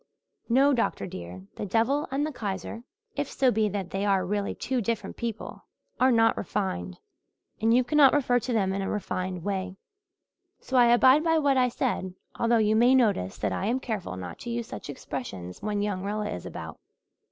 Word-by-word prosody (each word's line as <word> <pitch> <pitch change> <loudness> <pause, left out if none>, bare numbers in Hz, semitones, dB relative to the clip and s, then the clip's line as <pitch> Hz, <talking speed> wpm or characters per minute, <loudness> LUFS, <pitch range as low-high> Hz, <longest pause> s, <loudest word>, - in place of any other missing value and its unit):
"No, 270 +4 +5
doctor, 235 -3 0
dear, 90 - -8
the - - -3
devil 230 +9 +1
and 280 +2 0
the 310 - -3
Kaiser 205 - -5 0.3
if - - -2
so 260 -2 +3
be 215 -1 +1
that 195 -2 -4
they 195 +1 -2
are 195 -2 +2
really 205 +2 -2
two 255 -1 -2
different 230 +1 -3
people 230 -2 -6 0.3
are 260 +1 +5
not 225 -1 +4
refined. 90 - -3 0.6
And 225 +1 +3
you 250 +2 +5
cannot 280 +1 +5
refer 250 -4 +2
to 250 - -4
them 195 -5 +1
in 195 - -2
a 195 - -2
refined 185 -3 -3
way. 190 -1 -3 0.8
So 260 - -5
I 245 -1 +6
abide 260 +5 +6
by 325 -1 +3
what 285 -3 +3
I 250 -1 +3
said, 210 -7 -2 0.2
although 235 0 +3
you 215 -1 +3
may 245 +4 +5
notice 205 - +1
that 105 - -1
I 190 - -2
am 245 +4 +1
careful 215 - -4
not 90 -2 -7
to - - -7
use 235 0 -2
such - - -8
expressions 110 -10 -6
when 205 -1 -1
young 195 -3 -2
Rilla 210 +1 -2
is 90 - -6
about. - - -8
215 Hz, 195 wpm, -27 LUFS, 190-250 Hz, 0.8 s, I